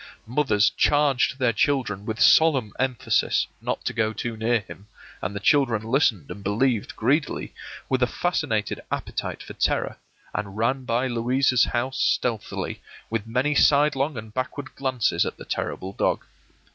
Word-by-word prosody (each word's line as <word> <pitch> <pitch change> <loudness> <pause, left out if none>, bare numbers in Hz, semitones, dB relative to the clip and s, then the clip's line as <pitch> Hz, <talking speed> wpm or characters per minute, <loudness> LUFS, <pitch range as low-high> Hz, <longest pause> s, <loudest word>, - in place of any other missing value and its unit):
Mothers 115 -4 +2
charged 145 -3 +2
their 125 -3 +2
children 110 -5 0
with 110 0 -3
solemn 135 -10 +5
emphasis 130 -2 +1 0.2
not - - -3
to - - -1
go 110 0 0
too 115 +1 -4
near 115 +1 +1
to - - -24
him, 100 - -12 0.3
and 100 +2 -3
the - - -2
children 120 -2 +2
listened 110 - +1
and 100 - -8
believed 110 +2 0
greedily, 145 +6 0 0.3
with 130 -1 0
a 125 - +4
fascinated 140 - -1
appetite - - -4
for - - -9
terror, - - 0 0.4
and 100 -1 -4
ran 130 +4 0
by 120 +2 +1
Louisa's 125 +1 +2
house 130 +2 -2
stealthily, 115 -4 -1 0.3
with 115 -1 -2
many 125 +6 +1
sidelong 145 -1 +3
and 110 -1 -8
backward 130 +2 -4
glances 130 -4 0
at - - -4
the - - -10
terrible 95 +1 -4
dog. - - 0
120 Hz, 155 wpm, -24 LUFS, 110-135 Hz, 0.4 s, solemn